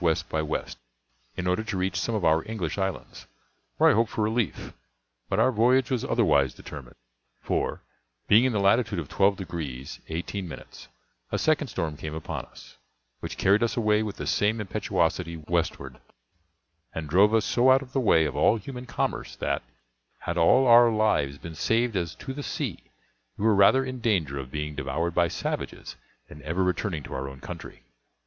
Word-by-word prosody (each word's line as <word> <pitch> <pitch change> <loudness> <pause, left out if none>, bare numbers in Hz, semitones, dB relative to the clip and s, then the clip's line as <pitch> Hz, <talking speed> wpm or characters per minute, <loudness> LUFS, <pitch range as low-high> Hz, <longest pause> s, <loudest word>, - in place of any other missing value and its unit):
W. 80 -2 +3
by 80 - -1
W., 75 0 -1 0.7
in 90 - -3
order 90 +4 +1
to 110 -3 -4
reach 95 +1 -1
some 115 - -1
of 100 -5 -1
our 80 0 +3
English 100 -5 -3
islands, 95 -2 -4 0.5
where - - +6
I - - +3
hoped 115 +1 +2
for 110 - -2
relief; 110 -4 -1 0.6
but 95 - 0
our 125 +3 +4
voyage 125 +3 +3
was 125 -3 0
otherwise 70 -3 +2
determined; 70 -5 -10 0.4
for, - - -2 0.4
being 110 +4 +6
in 130 - +2
the 105 - 0
latitude 100 +1 +2
of 80 -4 -3
twelve 100 0 +2
degrees 75 -8 -6
eighteen 90 +4 -4
minutes, 80 - -11 0.4
a - - 0
second 155 -2 +1
storm 80 - -3
came 80 0 -6
upon 80 - -5
us, - - -16 0.4
which - - -6
carried 100 +3 +3
us 120 0 0
away 105 -2 +3
with 105 -2 -4
the - - -5
same 105 +2 +1
impetuosity 90 -4 -1
westward, 75 - -3 1.0
and 80 -2 -4
drove 95 +7 +5
us 110 -2 +2
so 125 +2 +3
out 135 +1 +5
of 130 -1 -15
the 135 - +1
way 80 -10 +4
of - - -3
all 115 - +4
human 125 +4 -8
commerce - - -3
that, - - -1 0.6
had - - -3
all 125 +11 +5
our 120 -1 +7
lives 105 -11 +1
been 85 +2 -9
saved 115 +7 +1
as 85 -3 -2
to 135 - -7
the 145 - -6
sea, - - -4 0.5
we 105 - -2
were 110 - +5
rather 105 +7 +5
in 130 -1 -5
danger 85 - 0
of 65 -2 -7
being 75 +2 -4
devoured 75 +5 -2
by 85 0 +3
savages - - -5 0.3
than 75 - -12
ever 80 +6 -1
returning 90 -3 -1
to - - -8
our 70 +1 -4
own 70 0 -11
country. - - -9
95 Hz, 185 wpm, -26 LUFS, 80-115 Hz, 1.0 s, our